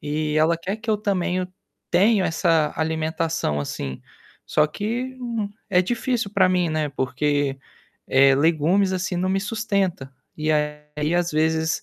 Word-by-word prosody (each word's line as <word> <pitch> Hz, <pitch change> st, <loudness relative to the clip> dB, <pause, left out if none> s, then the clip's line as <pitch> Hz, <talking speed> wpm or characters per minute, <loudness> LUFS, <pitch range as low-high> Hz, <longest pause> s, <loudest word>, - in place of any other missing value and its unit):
e 150 Hz, +1 st, -2 dB
ela 160 Hz, +2 st, +3 dB
quer 190 Hz, +5 st, -3 dB
que 220 Hz, +1 st, -4 dB
eu 215 Hz, -, +3 dB
também 185 Hz, -3 st, 0 dB
eu 180 Hz, 0 st, -3 dB, 0.4 s
tenho 200 Hz, +3 st, +4 dB
essa 160 Hz, -2 st, +2 dB
alimentação 160 Hz, -, -1 dB
assim, 70 Hz, -2 st, -5 dB, 0.4 s
só 150 Hz, -, +3 dB
que, 235 Hz, +10 st, -4 dB
hum, 230 Hz, -4 st, -3 dB, 0.2 s
é 180 Hz, -2 st, +5 dB
difícil 235 Hz, +1 st, -1 dB
para 195 Hz, -2 st, +4 dB
mim, 180 Hz, -2 st, +1 dB
né, 155 Hz, -1 st, 0 dB
porque, 140 Hz, +1 st, -1 dB, 0.5 s
eh, 135 Hz, +1 st, +5 dB
legumes, 165 Hz, +6 st, +2 dB
assim, 185 Hz, 0 st, -2 dB
não 185 Hz, +2 st, 0 dB
me 195 Hz, +1 st, +1 dB
sustenta 200 Hz, -, -2 dB, 0.2 s
e, 155 Hz, 0 st, 0 dB
aí, 150 Hz, +1 st, -2 dB
às 175 Hz, 0 st, +1 dB
vezes, 160 Hz, +1 st, +1 dB
165 Hz, 150 wpm, -23 LUFS, 150-195 Hz, 0.5 s, é